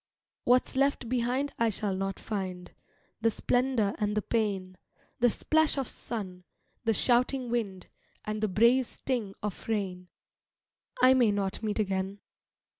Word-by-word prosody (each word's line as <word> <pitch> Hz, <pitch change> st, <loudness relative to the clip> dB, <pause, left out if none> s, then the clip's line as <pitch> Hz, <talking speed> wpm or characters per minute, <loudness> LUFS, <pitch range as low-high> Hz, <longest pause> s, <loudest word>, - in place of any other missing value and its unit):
What's 250 Hz, +2 st, +3 dB
left 275 Hz, -2 st, +1 dB
behind 255 Hz, +3 st, 0 dB
I 230 Hz, -1 st, +3 dB
shall 205 Hz, -2 st, -2 dB
not 195 Hz, +1 st, -2 dB
find, 185 Hz, -4 st, -5 dB, 0.5 s
The 225 Hz, -, +4 dB
splendour 245 Hz, -2 st, +1 dB
and 210 Hz, 0 st, 0 dB
the 210 Hz, -, +1 dB
pain; 195 Hz, -5 st, -1 dB, 0.4 s
The 245 Hz, 0 st, +5 dB
splash 315 Hz, +6 st, +2 dB
of 270 Hz, -3 st, -1 dB
sun, 185 Hz, -6 st, -5 dB, 0.4 s
the 225 Hz, -, +3 dB
shouting 250 Hz, +1 st, +2 dB
wind, 200 Hz, -6 st, -2 dB, 0.4 s
And 215 Hz, 0 st, -3 dB
the 215 Hz, -, +2 dB
brave 235 Hz, +6 st, +4 dB
sting 230 Hz, -7 st, -3 dB
of 210 Hz, -3 st, -5 dB
rain, 190 Hz, -5 st, -2 dB, 1.0 s
I 260 Hz, -, +8 dB
may 245 Hz, -4 st, +4 dB
not 200 Hz, 0 st, -2 dB
meet 215 Hz, -2 st, -2 dB
again. 195 Hz, -1 st, -1 dB
215 Hz, 140 wpm, -29 LUFS, 195-245 Hz, 1.0 s, I